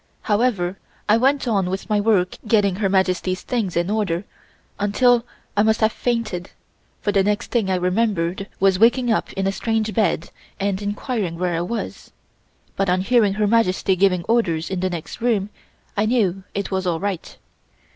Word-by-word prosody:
However, 205 -4 0 0.3
I 210 - +5
went 270 +2 +2
on 195 -5 +1
with 190 +1 -4
my 210 -1 +2
work 200 -4 +1
getting 205 -4 +3
Her 200 -2 +1
Majesty's 185 -1 0
things 215 -9 -2
in 175 +3 0
order 200 -5 0 0.6
until 240 +4 +3 0.3
I 205 - +4
must 220 +1 +3
have 220 0 +4
fainted, 220 -8 -2 0.5
for 205 - 0
the 195 -1 +3
next 205 +1 -1
thing 225 -6 +1
I 190 - +2
remembered 185 0 0
was 190 -1 +3
waking 240 +2 +4
up 220 - 0
in 195 - -2
a 195 - +2
strange 220 +1 -1
bed 180 -6 0 0.3
and 195 0 -1
inquiring 205 -3 -3
where 180 0 -1
I 165 - 0
was, 220 +7 -5 0.6
but 195 -1 0
on 185 +1 +2
hearing 210 -2 +3
Her 210 0 +1
Majesty 200 -3 +2
giving 185 -2 +2
orders 170 -8 0
in 190 - -1
the 185 +1 0
next 175 +6 -6
room, 210 -4 +1 0.4
I 210 +1 +1
knew 195 -6 +1
it 200 0 -3
was 190 -1 -1
all 165 -2 0
right. 195 -2 -4
200 Hz, 175 wpm, -21 LUFS, 185-220 Hz, 0.6 s, I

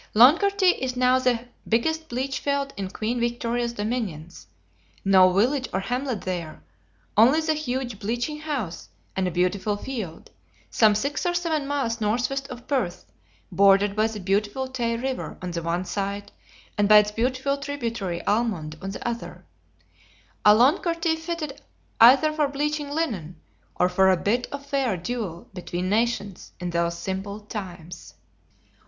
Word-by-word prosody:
Loncarty 360 - +5
is 255 -1 -2
now 255 +1 +4
the 245 -2 0 0.2
biggest 320 +8 0
bleach 260 +3 -2
field 280 -1 -1
in 195 -1 -4
Queen 225 +5 -2
Victoria's 235 0 -1
dominions; 205 -8 -4 0.6
no 190 -1 +6
village 250 +8 +1
or 190 - 0
hamlet 245 +3 -2
there, 175 -4 -5 0.5
only 250 +8 +6
the 315 0 +1
huge 255 -7 -3
bleaching 240 +8 -2
house 280 - -4 0.3
and 190 -1 0
a - - +1
beautiful 185 +4 0
field, 210 -9 -6 0.4
some 215 -2 +4
six 280 +8 -1
or 350 -1 0
seven 320 -5 -1
miles 250 -5 -1
northwest 245 +6 0
of 245 -1 -9
Perth, 250 -12 -2 0.5
bordered 200 0 +4
by 215 +1 +3
the 220 -1 -6
beautiful 205 +7 -1
Tay 235 -3 -2
river 260 +2 -4
on 180 -1 -5
the 170 -1 -3
one 170 +2 -2
side, 200 +1 -4 0.5
and 205 0 +3
by 210 - +9
its 210 0 +4
beautiful 260 +5 0
tributary 235 - -4
Almond 200 -9 0
on 195 - -4
the 195 - -5
other; 235 0 -5 1.0
a 210 0 +8
Loncarty 330 - +2
fitted 320 -3 -5 0.4
either 275 +7 +7
for 305 -1 +1
bleaching 295 +1 -2
linen, 210 - -3 0.4
or 180 - +3
for 190 +1 +4
a 185 - +4
bit 235 +8 0
of 280 0 -6
fair 270 -8 0
duel 185 -3 -5
between 180 0 -3
nations, 215 -3 -1
in 180 -1 -3
those 170 0 0
simple 195 +3 -4
times. 185 -5 -8
230 Hz, 150 wpm, -25 LUFS, 195-275 Hz, 1.0 s, by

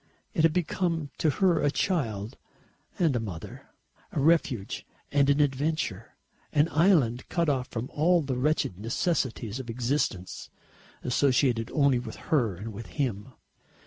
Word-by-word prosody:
It 170 - +1
had 165 0 +5
become 165 -2 -1
to 160 - +3
her 180 +4 +2
a 145 - +3
child 115 - -1 0.6
and 165 -7 +2
a - - +1
mother, 95 -8 -7 0.4
a - - -2
refuge 140 -9 +1 0.3
and 140 -1 +3
an 140 +1 +3
adventure, 145 - -1 0.4
an 150 +2 +3
island 150 - +3
cut 170 -3 +1
off 130 -3 0
from 115 +2 -4
all 170 +2 +3
the 135 -2 -2
wretched 135 - 0
necessities 120 - -1
of 125 -2 -7
existence, 115 -6 -2 0.5
associated 125 -2 +2
only 140 -4 +3
with 120 - -7
her 120 - 0
and 105 +5 -7
with 110 +3 -8
him. 125 -4 -3
135 Hz, 145 wpm, -28 LUFS, 115-155 Hz, 0.6 s, had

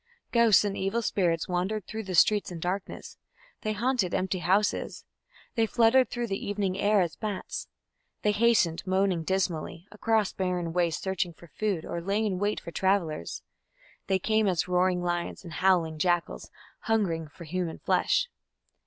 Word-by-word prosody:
Ghosts 230 -4 +5
and 200 -1 -1
evil 195 +5 -1
spirits 170 -6 0
wandered 185 +3 -1
through 220 -1 -6
the 185 -1 -3
streets 205 +3 +4
in 170 - -6
darkness; 185 +4 -4 0.4
they 215 - -1
haunted 235 -3 0
empty 185 0 -1
houses; 190 +5 0 0.5
they 225 -2 +2
fluttered 240 +3 +4
through 240 0 -2
the 195 -3 -3
evening 200 -2 -1
air 205 0 +4
as 170 -3 -1
bats; 210 -3 -5 0.6
they 210 - +3
hastened, 210 -6 +3
moaning 190 -2 +2
dismally, 175 -2 -2
across 215 0 +1
barren 180 -3 -2
wastes 170 -2 0
searching 190 -2 -1
for 170 - -16
food 200 -7 -1
or 170 - -4
lay 200 +5 0
in 190 -4 -1
wait 205 +1 0
for 170 - -9
travellers; 175 - -1 0.6
they 190 - +3
came 215 +2 +1
as 180 -2 +1
roaring 180 0 +2
lions 175 +1 -2
and 170 -3 -9
howling 170 -4 +2
jackals, 175 - 0 0.3
hungering 190 -8 0
for 160 +4 -12
human 170 0 -3
flesh. - - +1
190 Hz, 160 wpm, -28 LUFS, 175-210 Hz, 0.6 s, Ghosts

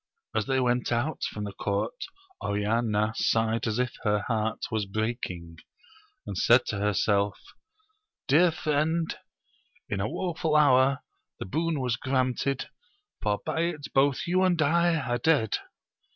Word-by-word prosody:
As 110 -2 -1
they 135 0 +2
went 125 -1 +1
out 125 +6 -1
from 105 - -6
the 100 -1 -5
court, 100 - -2 0.4
Oriana 105 +1 0
sighed 115 +1 +1
as 110 0 -1
if 125 -1 0
her 105 -1 +1
heart 110 -1 0
was 110 -3 -1
breaking; 95 -6 -4 0.7
and 100 - -5
said 120 +7 +4
to 105 - -2
herself, 105 0 +1 0.9
Dear 160 +6 +5
friend, 160 +1 0 0.7
in 100 - -2
a 105 +3 -1
woe 180 -2 -2
ful 160 -1 -1
hour 140 -2 +4 0.3
the - - -6
boon 160 - -1
was 125 -3 0
granted, 130 +1 -1 0.5
for 105 -1 0
by - - -2
it 165 -4 -3
both 135 0 +2
you 185 +2 +2
and 180 -3 +2
I 170 +3 +3
are 120 -5 -1
dead 135 -6 +2
120 Hz, 145 wpm, -27 LUFS, 105-150 Hz, 0.9 s, Dear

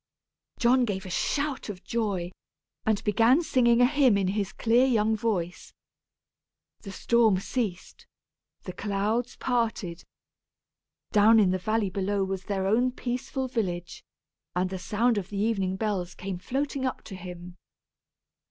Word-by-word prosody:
John 250 +1 +4
gave 195 -3 -3
a 185 - -7
shout 280 +5 -1
of 190 -3 -7
joy, 200 -7 -2 0.6
and 215 -2 +1
began 230 - +4
singing 240 -5 +3
a - - +7
hymn 265 -5 +4
in 190 -2 +1
his 200 0 -1
clear 240 +3 +3
young 220 -3 +2
voice. 190 -6 -3 1.0
The 195 - -9
storm 225 0 +3
ceased. 195 -2 -4 0.6
The 185 - -6
clouds 210 +5 -1
parted. 225 -8 -2 1.1
Down 220 +1 +6
in 195 -4 +4
the 185 - 0
valley 215 0 0
below 195 +1 0
was 190 0 -4
their 195 -2 -2
own 240 +6 +2
peaceful 255 +1 -3
village, 180 -8 -3 0.5
and 185 +1 0
the 190 - -4
sound 225 +3 +1
of 190 -1 -8
the 205 - -5
evening 195 -3 0
bells 190 -4 -2
came 185 -1 -5
floating 275 +6 -2
up 255 - -2
to 195 - -9
him. 180 -1 -9
210 Hz, 145 wpm, -27 LUFS, 190-235 Hz, 1.1 s, a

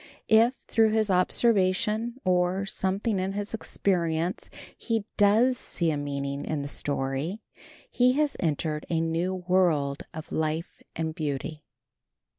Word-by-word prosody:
If, 230 +3 +5
through 220 -1 +3
his 215 -2 +2
observation 215 +4 +2
or 180 +1 +1
something 195 +2 -1
in 190 +1 -2
his 205 +2 -4
experience, 175 -5 -1 0.3
he 225 -3 -2
does 225 +5 +4
see 170 -2 0
a - - -1
meaning 140 -1 -3
in 150 -2 -2
the - - -4
story 145 +8 -2 0.5
he 250 0 +4
has 295 +1 +1
entered 155 -2 -1
a 165 - +1
new 165 +3 -1
world 160 -6 +1
of 160 -2 -9
life 160 +2 -2
and 160 -1 -2
beauty. 150 -1 -4
180 Hz, 130 wpm, -27 LUFS, 155-215 Hz, 0.5 s, If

